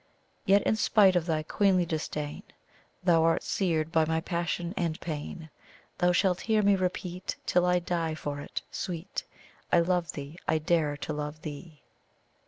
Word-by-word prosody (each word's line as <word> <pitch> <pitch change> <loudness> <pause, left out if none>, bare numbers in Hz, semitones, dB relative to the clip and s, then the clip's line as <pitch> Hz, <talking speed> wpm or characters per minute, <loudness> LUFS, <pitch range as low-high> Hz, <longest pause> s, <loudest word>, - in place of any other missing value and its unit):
"Yet 200 +1 +5
in 220 - +2
spite 200 -3 +5
of 175 -1 +1
thy 155 -2 0
queenly 185 +2 +2
disdain, 150 -2 -4 0.6
Thou 170 -3 +4
art 165 0 +2
seared 165 -5 0
by 160 -1 +4
my 160 +1 0
passion 170 +1 -2
and 165 -3 -1
pain; 160 0 -6 0.5
Thou 180 0 +4
shalt 180 0 +2
hear 220 -1 +2
me 200 0 +5
repeat, 180 -1 -3
till 180 0 +3
I 180 0 +4
die 170 -2 -1
for 145 -2 -4
it, 145 - -5
sweet! 175 +1 -4 0.5
'I 170 - +6
love 175 0 0
thee! 145 +4 -8
I 160 - +3
dare 155 -2 +1
to 155 - -4
love 150 +1 -5
THEE!'" 150 -1 -8
170 Hz, 165 wpm, -29 LUFS, 155-180 Hz, 0.6 s, I